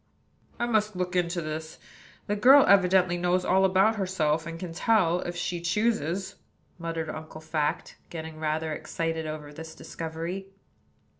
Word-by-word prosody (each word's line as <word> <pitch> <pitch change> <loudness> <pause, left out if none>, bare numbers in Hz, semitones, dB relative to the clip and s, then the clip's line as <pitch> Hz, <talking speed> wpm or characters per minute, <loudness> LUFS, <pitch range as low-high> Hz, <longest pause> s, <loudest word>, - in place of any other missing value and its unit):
"I 240 - +1
must 215 -3 +1
look 180 0 -2
into 175 -1 0
this. 155 +1 -5 0.5
The 205 - -1
girl 265 +6 +7
evidently 185 -2 +4
knows 180 +1 +1
all 190 +1 +3
about 195 +4 +3
herself, 165 -5 0
and 165 0 -6
can 175 -2 -6
tell, 180 -3 +2
if 175 0 -4
she 175 0 -3
chooses," 190 -1 0 0.4
muttered 165 -1 -3
Uncle 155 0 -7
Fact, 155 -1 -2
getting 160 -1 -7
rather 155 0 -1
excited 165 0 -3
over 150 -1 -6
this 160 +1 -9
discovery. 165 +4 -5
175 Hz, 145 wpm, -27 LUFS, 160-190 Hz, 0.5 s, girl